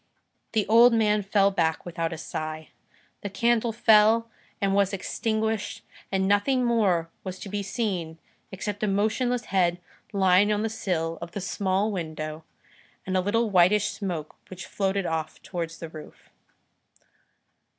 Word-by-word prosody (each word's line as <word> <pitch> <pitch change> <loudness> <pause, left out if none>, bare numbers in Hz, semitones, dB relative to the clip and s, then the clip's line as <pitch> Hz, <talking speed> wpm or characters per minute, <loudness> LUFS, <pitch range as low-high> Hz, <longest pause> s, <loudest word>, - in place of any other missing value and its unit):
The 215 -2 +2
old 230 +3 +6
man 210 -2 +3
fell 200 0 +2
back 165 -4 0
without 165 -1 -3
a 165 - -5
sigh. 155 0 -5 0.5
The 205 - -4
candle 230 +3 +1
fell 220 +1 +4 0.3
and 195 -1 +1
was 200 0 +2
extinguished, 220 +2 -2 0.3
and 190 0 +1
nothing 245 +6 +2
more 190 -8 +1
was 185 -1 -6
to 195 - -8
be 205 +1 -2
seen 185 -6 -3 0.3
except 205 +1 -5
a 215 - +1
motionless 220 +5 0
head 175 -2 +2 0.3
lying 195 0 +4
on 210 0 0
the 225 - 0
sill 165 -6 -2
of 170 0 -7
the - - -3
small 195 +2 0
window, 155 -3 -5 0.6
and 190 - -2
a 185 - +3
little 220 +3 0
whitish 190 +3 +4
smoke 180 -7 -5
which 185 0 -8
floated 195 -1 -1
off 160 -1 -3
towards 165 -2 -5
the 165 - -7
roof. 155 -1 -13
195 Hz, 150 wpm, -26 LUFS, 175-215 Hz, 0.6 s, old